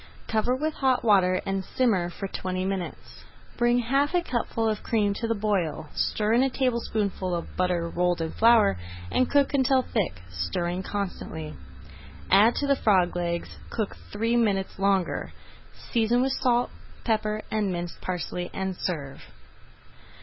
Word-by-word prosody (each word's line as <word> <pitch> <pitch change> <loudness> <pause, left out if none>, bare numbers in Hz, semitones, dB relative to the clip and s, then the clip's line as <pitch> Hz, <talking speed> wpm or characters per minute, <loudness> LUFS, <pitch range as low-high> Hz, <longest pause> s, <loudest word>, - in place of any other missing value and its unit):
Cover 225 +3 +1
with 305 +4 -1
hot 260 -3 +1
water 185 -4 +4
and 195 0 -1
simmer 195 -7 +1
for 195 +3 -5
twenty 185 -1 -3
minutes. 190 -2 -5 0.3
Bring 240 0 +3
half 275 +7 +1
a 350 - +2
cupful 230 -4 -1
of 215 -1 -1
cream 210 -3 +1
to 230 +3 -3
the 230 - +1
boil, 195 -8 -1
stir 215 +1 0
in 240 - +5
a 270 - +3
tablespoonful 220 -8 -1
of 170 - -6
butter 180 -2 0
rolled 175 +1 0
in 160 -1 -2
flour, 225 - +4 0.3
and 255 - +2
cook 285 0 +3
until 265 -1 +3
thick, 190 - -2
stirring 170 - -2
constantly. 180 -6 -4 0.8
Add 210 +5 +6
to 285 - 0
the 280 0 +3
frog 185 -8 +3
legs, 170 -1 -3
cook 215 -3 -3 0.2
three 225 +3 0
minutes 200 -5 +1
longer, 195 -2 0 0.6
season 235 +2 +3
with 265 - +1
salt, 245 -2 +1 0.3
pepper, 215 -1 0
and 210 -3 0
minced 175 -1 -5
parsley, 180 0 -3
and 190 -1 -2
serve. 145 -7 -4
205 Hz, 150 wpm, -26 LUFS, 180-240 Hz, 0.8 s, Add